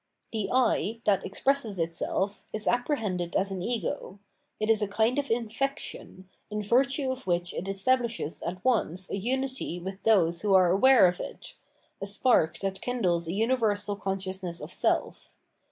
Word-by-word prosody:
The 210 -3 -2
I, 230 -4 +1
that 195 -4 +2
ex 195 - -6
presses 270 -7 +1
itself, 190 +4 -2
is 215 0 -5
apprehended 225 - 0
as 195 +1 +1
an 190 -2 -4
ego; 205 -2 -3 0.4
it 215 - 0
is 225 -1 +3
a 210 - +1
kind 225 +6 +1
of 280 - -3
infection, 230 -4 -3 0.2
in 210 0 -3
virtue 265 +5 +2
of 260 -6 -7
which 175 0 0
it 190 - -4
establishes 230 - 0
at 180 +2 -5
once 190 -7 0
a - - -1
unity 260 -3 -2
with 190 +2 -7
those 175 -6 +3
who 205 -2 +3
are 180 -2 +5
aware 255 +4 +6
of 180 +1 -2
it, - - -8 0.5
a 195 - -3
spark 200 -5 +2
that 195 -1 -3
kindles 180 -9 0
a - - -2
universal 210 -2 +1
consciousness 190 -3 -3
of - - -8
seif. - - -1
205 Hz, 165 wpm, -28 LUFS, 185-240 Hz, 0.5 s, aware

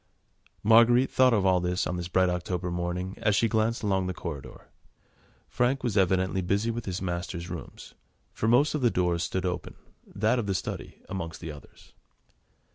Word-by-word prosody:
Marguerite 115 +4 +5
thought 130 0 +5
of 105 -4 +2
all 95 -1 +4
this 90 0 -1
on 90 - -2
this 90 -1 -4
bright 95 +1 +3
October 90 0 -2
morning 90 +2 -3
as 105 -2 +2
she 115 - +3
glanced 110 +1 0
along 95 -2 +1
the 90 - -3
corridor. 75 -6 -8 0.8
Frank 125 +2 0
was 120 -5 -1
evidently 95 -1 +2
busy 100 +5 0
with 115 0 -5
his 95 0 -3
master's 85 -1 -4
rooms, 85 - -9 0.4
for 110 - -2
most 125 +6 +4
of 150 - -1
the 120 - +4
doors 90 -4 0
stood 95 +1 -2
open, 90 -1 -4 0.3
that 110 +5 +1
of 110 - -3
the 95 - 0
study - - -5
amongst 85 -4 -5
the 80 -2 -6
others. 75 -1 -15
95 Hz, 180 wpm, -27 LUFS, 90-110 Hz, 0.8 s, Marguerite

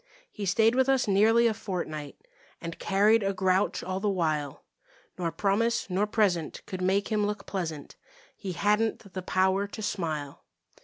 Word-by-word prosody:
He 205 -2 -5
stayed 225 +4 +4
with 260 +1 +2
us 265 -3 +2
nearly 220 +4 +4
a 230 - +3
fortnight 180 - -6 0.3
And 165 -1 -7
carried 210 +3 +3
a 195 0 0
grouch 190 +1 +1
all 185 0 -3
the 205 +1 0
while, 155 -7 -1 0.6
Nor 170 -2 -1
promise 200 +5 0
nor 200 +3 +1
present 195 -7 0
could 185 -1 -6
make 195 +2 +1
him 210 -2 +1
look 210 -1 -4
pleasant; 160 -7 -5 0.4
He 190 -3 -5
hadn't 210 0 0
the 185 - -4
power 190 +2 +1
to 215 - -8
smile. 155 -8 -3
195 Hz, 160 wpm, -28 LUFS, 180-210 Hz, 0.6 s, stayed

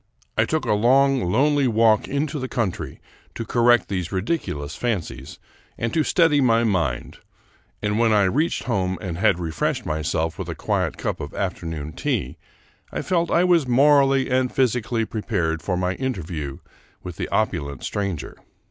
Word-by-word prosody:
I - - +3
took - - -1
a - - +2
long, 130 -1 +3
lonely 145 +3 +3
walk 110 -2 +3
into 145 +2 -2
the 130 - -3
country 95 - -3 0.4
to 115 - -4
correct 120 +1 +3
these 90 -3 -3
ridiculous 95 - -2
fancies 80 - -3 0.4
and 115 0 -2
to 160 - +3
steady 155 -3 +3
my 115 -2 +3
mind, 85 - -1 0.6
and 105 +1 0
when 115 -1 +3
I 105 -1 +4
reached 145 - +1
home 95 -6 -1
and 90 -5 -5
had 90 - +3
refreshed 80 -3 -2
myself 80 +1 -2
with - - -4
a - - -4
quiet - - -1
cup - - -3
of 75 - -7
afternoon 80 -5 -4
tea, 65 +3 -2 0.5
I - - -3
felt 170 -2 0
I 170 - +3
was 175 -6 +3
morally 135 +1 +4
and 130 -1 +1
physically 120 -3 0
pre 110 0 -5
pared 80 -8 -1
for 90 -2 -1
my 90 0 0
interview 85 - -4 0.5
with 90 -2 -7
the - - -3
opulent 70 -3 -1
stranger. 100 -6 -3
110 Hz, 165 wpm, -23 LUFS, 85-130 Hz, 0.6 s, I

